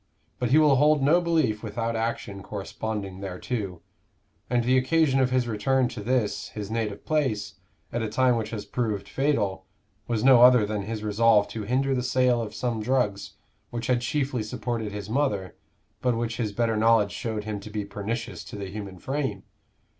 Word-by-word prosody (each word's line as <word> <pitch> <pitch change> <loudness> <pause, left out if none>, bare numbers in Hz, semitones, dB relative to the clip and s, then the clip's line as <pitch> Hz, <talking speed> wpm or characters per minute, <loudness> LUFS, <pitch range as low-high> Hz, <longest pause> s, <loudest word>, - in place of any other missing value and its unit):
But 125 - 0
he 140 - +5
will 150 -3 +5
hold 150 0 +4
no 165 +6 +5
belief 155 -11 +1
without 115 +1 -3
action 110 -3 -3
corresponding 100 -1 -5
thereto; 95 -1 -4 0.7
and 120 -1 +2
the 125 +2 +3
occasion 135 +1 +3
of 130 -1 +3
his 125 -1 +1
return 125 +3 +1
to 120 -3 -7
this, 110 -3 0
his 105 -1 -6
native 110 -3 -3
place, 130 -10 -1 0.3
at 120 - -1
a 110 - -2
time 130 +1 +3
which 115 -2 -2
has 110 -3 -5
proved 105 -5 -2
fatal, 100 -10 0 0.4
was 115 -2 -1
no 130 -2 +7
other 125 -3 +7
than 105 0 -2
his 110 +1 -5
resolve 105 0 +4
to 110 -2 -5
hinder 135 +4 +1
the 125 - 0
sale 125 -1 +2
of 105 -2 -6
some 120 -3 -2
drugs, 105 -5 0 0.4
which 120 -1 -4
had 125 0 +2
chiefly 130 -1 -1
supported 110 0 -3
his 100 -1 -6
mother, 105 - -1 0.5
but 125 -2 +1
which 115 -1 -2
his 110 -4 -1
better 115 +1 0
knowledge 110 -2 +4
showed 110 +1 -3
him 105 -1 -4
to 100 - -10
be 105 -1 -3
pernicious 105 +3 -4
to 115 - -9
the 100 -2 -6
human 100 -2 -7
frame. 135 -3 -3
115 Hz, 185 wpm, -26 LUFS, 105-125 Hz, 0.7 s, no